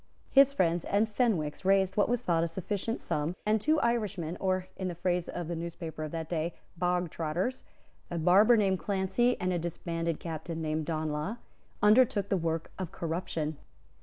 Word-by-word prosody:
His 275 Hz, 0 st, +7 dB
friends 175 Hz, -, +1 dB
and 205 Hz, +2 st, +2 dB
Fenwick's 205 Hz, -, 0 dB
raised 190 Hz, 0 st, +3 dB
what 205 Hz, -, +3 dB
was 245 Hz, 0 st, 0 dB
thought 165 Hz, -4 st, +2 dB
a -, -, +1 dB
sufficient 195 Hz, +6 st, -3 dB
sum; 150 Hz, +4 st, -2 dB
and 215 Hz, 0 st, +2 dB
two 310 Hz, +6 st, +3 dB
Irishmen, 210 Hz, -8 st, -1 dB
or, 185 Hz, -1 st, 0 dB
in 190 Hz, -, -3 dB
the 175 Hz, -, -4 dB
phrase 175 Hz, 0 st, -1 dB
of 175 Hz, -2 st, -4 dB
the 170 Hz, -, -3 dB
newspapers 165 Hz, -2 st, -5 dB
of -, -, -11 dB
that 165 Hz, -1 st, -4 dB
day, 165 Hz, 0 st, -2 dB, 0.3 s
bogtrotters, 180 Hz, +4 st, -1 dB, 0.5 s
a 175 Hz, -, -3 dB
barber 195 Hz, +8 st, +6 dB
named 190 Hz, -3 st, +2 dB
Clancy, 195 Hz, +7 st, +1 dB
and 180 Hz, 0 st, 0 dB
a 175 Hz, -, 0 dB
disbanded 165 Hz, 0 st, -3 dB
captain 165 Hz, 0 st, -5 dB
named 155 Hz, -1 st, -2 dB
Donelagh, 155 Hz, +5 st, -2 dB, 0.5 s
undertook 210 Hz, -2 st, +5 dB
the -, -, +2 dB
work 165 Hz, -1 st, -2 dB
of 185 Hz, -3 st, -4 dB
corruption. 160 Hz, -2 st, -3 dB
175 Hz, 170 wpm, -30 LUFS, 165-205 Hz, 0.5 s, His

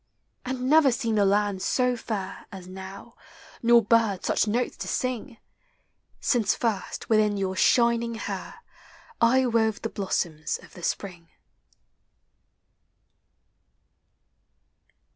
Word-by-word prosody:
And 255 Hz, 0 st, -3 dB
never 300 Hz, -1 st, +5 dB
seemed 230 Hz, -2 st, 0 dB
the 200 Hz, -, +4 dB
land 200 Hz, -1 st, +1 dB
so 250 Hz, +3 st, +1 dB
fair 200 Hz, -5 st, -5 dB
As 185 Hz, -2 st, -9 dB
now, 190 Hz, +4 st, -10 dB, 0.5 s
nor 235 Hz, 0 st, +5 dB
birds 215 Hz, -3 st, +2 dB
such -, -, +1 dB
notes 240 Hz, +4 st, -1 dB
l«» -, -, -8 dB
sing. 255 Hz, -1 st, -3 dB, 0.8 s
Since 235 Hz, -5 st, +1 dB
first 220 Hz, -5 st, -3 dB
within 215 Hz, -2 st, +3 dB
your 190 Hz, -1 st, -2 dB
shining 235 Hz, +2 st, +3 dB
hair 460 Hz, -, -6 dB, 0.6 s
I 255 Hz, +3 st, +4 dB
wove 225 Hz, -3 st, +1 dB
the 225 Hz, -, -1 dB
blossoms 170 Hz, -6 st, -2 dB
of -, -, -16 dB
the 180 Hz, -, -11 dB
spring. 175 Hz, -2 st, -4 dB
220 Hz, 110 wpm, -26 LUFS, 195-235 Hz, 0.8 s, never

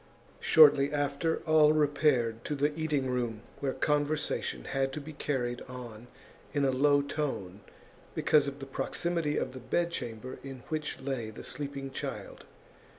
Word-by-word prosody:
Shortly 145 Hz, -2 st, +6 dB
after, 145 Hz, +2 st, 0 dB
all 155 Hz, -1 st, +6 dB
repaired 145 Hz, -6 st, +2 dB
to 150 Hz, -, -1 dB
the 145 Hz, +1 st, +1 dB
eating 150 Hz, -4 st, 0 dB
room, 120 Hz, -4 st, -2 dB, 0.2 s
where 135 Hz, -2 st, -1 dB
conversation 150 Hz, -, 0 dB
had 135 Hz, -, -1 dB
to 150 Hz, -, -3 dB
be 155 Hz, +2 st, -9 dB
carried 125 Hz, -5 st, -2 dB
on 120 Hz, -2 st, -9 dB, 0.5 s
in 145 Hz, -1 st, +3 dB
a 135 Hz, -, +3 dB
low 145 Hz, +2 st, +4 dB
tone 130 Hz, -11 st, -3 dB, 0.6 s
because 145 Hz, -2 st, +4 dB
of 140 Hz, 0 st, -4 dB
the 135 Hz, -, -7 dB
proximity 165 Hz, +3 st, -1 dB
of 130 Hz, -, -2 dB
the 130 Hz, -, -7 dB
bedchamber 130 Hz, -5 st, -3 dB
in 135 Hz, -3 st, -8 dB
which 155 Hz, -1 st, -3 dB
lay 130 Hz, -5 st, -3 dB
the 110 Hz, -, -9 dB
sleeping 140 Hz, 0 st, -5 dB
child. -, -, -6 dB
140 Hz, 150 wpm, -30 LUFS, 125-150 Hz, 0.6 s, Shortly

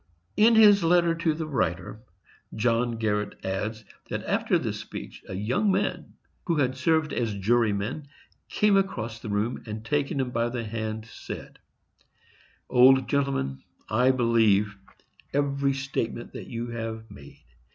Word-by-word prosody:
In 225 Hz, +2 st, +5 dB
his 205 Hz, -3 st, +7 dB
letter 170 Hz, 0 st, +4 dB
to 165 Hz, -2 st, 0 dB
the 160 Hz, 0 st, -3 dB
writer 110 Hz, -, -2 dB, 0.5 s
John 115 Hz, +1 st, +1 dB
Garret 105 Hz, -2 st, -1 dB
adds, 105 Hz, +4 st, -3 dB, 0.2 s
that -, -, -3 dB
after -, -, +1 dB
this -, -, -3 dB
speech -, -, -8 dB
a 95 Hz, -, -4 dB
young 125 Hz, -, +1 dB
man 190 Hz, +1 st, -1 dB, 0.3 s
who 170 Hz, -, +2 dB
had 130 Hz, -4 st, +1 dB
served 155 Hz, +3 st, +1 dB
as 115 Hz, -4 st, -1 dB
juryman 110 Hz, +5 st, 0 dB, 0.4 s
came 210 Hz, -1 st, +3 dB
across 120 Hz, -, -1 dB
the 110 Hz, -, -7 dB
room, 105 Hz, +4 st, -1 dB
and 110 Hz, +1 st, -6 dB
taking 145 Hz, +2 st, 0 dB
him 130 Hz, -2 st, -1 dB
by 115 Hz, 0 st, 0 dB
the 120 Hz, -1 st, -4 dB
hand, 110 Hz, 0 st, -4 dB
said: 115 Hz, -, -9 dB, 1.1 s
"Old 130 Hz, +1 st, +6 dB
gentleman, 135 Hz, -, -1 dB, 0.3 s
I 125 Hz, +4 st, +3 dB
believe 110 Hz, -5 st, +3 dB, 0.6 s
every 140 Hz, -1 st, +1 dB
statement 135 Hz, -3 st, -4 dB
that -, -, -8 dB
you 120 Hz, 0 st, -5 dB
have 115 Hz, -1 st, -6 dB
made. 70 Hz, -1 st, -14 dB
120 Hz, 140 wpm, -26 LUFS, 110-140 Hz, 1.1 s, his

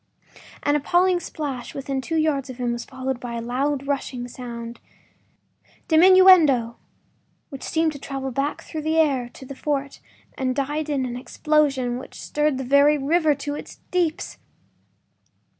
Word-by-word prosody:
” -, -, -20 dB
An 290 Hz, -, +2 dB
appalling 350 Hz, +5 st, +2 dB
splash 285 Hz, -7 st, -6 dB
within 275 Hz, -1 st, -3 dB
two 325 Hz, +5 st, -4 dB
yards 295 Hz, -4 st, 0 dB
of 255 Hz, -, -8 dB
him 245 Hz, -2 st, -1 dB
was 235 Hz, -, -4 dB
followed 260 Hz, -1 st, -4 dB
by 245 Hz, -1 st, -6 dB
a -, -, -2 dB
loud, 265 Hz, +4 st, -1 dB
rushing 265 Hz, -3 st, -3 dB
sound, 235 Hz, -2 st, -8 dB, 1.1 s
DIMINUENDO, 325 Hz, -9 st, +6 dB, 0.7 s
which 275 Hz, -4 st, -9 dB
seemed 320 Hz, 0 st, 0 dB
to 285 Hz, -, -9 dB
travel 270 Hz, -1 st, -5 dB
back 275 Hz, +4 st, -2 dB
through 315 Hz, -, -6 dB
the 315 Hz, +1 st, 0 dB
air 275 Hz, -6 st, +2 dB
to 265 Hz, -, -11 dB
the 275 Hz, -, -8 dB
fort 280 Hz, 0 st, -3 dB, 0.4 s
and 255 Hz, -2 st, -1 dB
died 295 Hz, +2 st, -2 dB
in 275 Hz, -3 st, 0 dB
an 245 Hz, -1 st, -4 dB
explosion 265 Hz, -2 st, 0 dB
which -, -, -11 dB
stirred 300 Hz, -2 st, 0 dB
the 265 Hz, -, -3 dB
very 280 Hz, +3 st, +4 dB
river 305 Hz, +2 st, +2 dB
to 290 Hz, +1 st, -5 dB
its -, -, -8 dB, 0.2 s
deeps! 345 Hz, -3 st, -1 dB
280 Hz, 160 wpm, -23 LUFS, 255-305 Hz, 1.1 s, DIMINUENDO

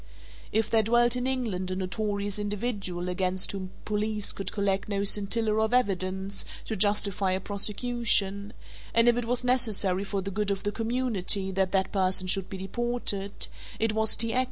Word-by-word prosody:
If 220 Hz, 0 st, +1 dB
there 225 Hz, -, +5 dB
dwelt 240 Hz, +2 st, +3 dB
in 250 Hz, +1 st, -1 dB
England 220 Hz, -9 st, -2 dB
a 185 Hz, -, -2 dB
notorious 200 Hz, +2 st, -2 dB
individual 205 Hz, -4 st, -3 dB
against 185 Hz, +1 st, +1 dB
whom 195 Hz, -1 st, -5 dB
the 185 Hz, -, -18 dB
police 210 Hz, 0 st, -1 dB
could 195 Hz, -, -5 dB
collect 200 Hz, -1 st, -1 dB
no 200 Hz, -1 st, -1 dB
scintilla 210 Hz, +2 st, +2 dB
of 220 Hz, +2 st, +1 dB
evidence 190 Hz, -3 st, 0 dB, 0.2 s
to 220 Hz, -, -3 dB
justify 200 Hz, -1 st, +2 dB
a 185 Hz, -, 0 dB
prosecution, 205 Hz, 0 st, +1 dB, 0.4 s
and 230 Hz, +1 st, +5 dB
if 240 Hz, -, +5 dB
it 245 Hz, -1 st, -2 dB
was 245 Hz, +1 st, +1 dB
necessary 220 Hz, -7 st, +3 dB
for 200 Hz, -1 st, -3 dB
the 195 Hz, -, -4 dB
good 205 Hz, +1 st, -1 dB
of 195 Hz, -1 st, -2 dB
the 205 Hz, -, -1 dB
community 220 Hz, -4 st, -1 dB
that 190 Hz, 0 st, 0 dB
that 190 Hz, -1 st, +1 dB
person 185 Hz, -1 st, +1 dB
should 190 Hz, 0 st, 0 dB
be 190 Hz, -, -6 dB
deported, 200 Hz, -1 st, -2 dB, 0.3 s
it 225 Hz, -1 st, 0 dB
was 220 Hz, 0 st, +2 dB
T. 230 Hz, 0 st, +2 dB
X. 255 Hz, -, +2 dB
205 Hz, 180 wpm, -27 LUFS, 190-225 Hz, 0.4 s, there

